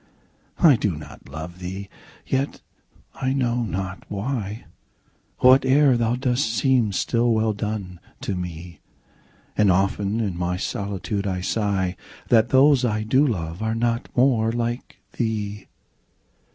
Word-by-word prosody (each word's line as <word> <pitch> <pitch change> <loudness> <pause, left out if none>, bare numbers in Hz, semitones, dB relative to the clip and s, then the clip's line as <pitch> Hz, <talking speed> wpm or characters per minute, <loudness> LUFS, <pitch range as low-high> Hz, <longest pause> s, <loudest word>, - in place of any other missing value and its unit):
I 150 -8 +6
do 105 -6 -1
not 75 - -11
love 80 +5 -8
thee!—yet, 100 +8 -5 0.5
I 130 -1 -1
know 125 -3 0
not 95 -2 -4
why, 105 0 -3 0.7
5 - - -30 0.2
Whate'er 135 0 +4
thou 120 0 +1
dost 125 -2 0
seems 120 -5 +2
still 120 0 +1
well 110 -1 +2
done, 100 -4 -4 0.2
to 100 - -2
me: 85 -2 -6 0.8
And 105 -2 +4
often 100 +3 +1
in 100 -6 -1
my 90 +1 -1
solitude 100 +1 -3
I 90 -1 -2
sigh 95 -2 0 0.3
That 115 -1 +4
those 135 0 +5
I 110 -3 0
do 130 +7 +3
love 85 -5 -3
are 110 0 -1
not 115 0 -1
more 120 -3 +3
like 120 +1 -3 0.2
thee! 105 -3 -2
110 Hz, 130 wpm, -23 LUFS, 95-120 Hz, 0.8 s, I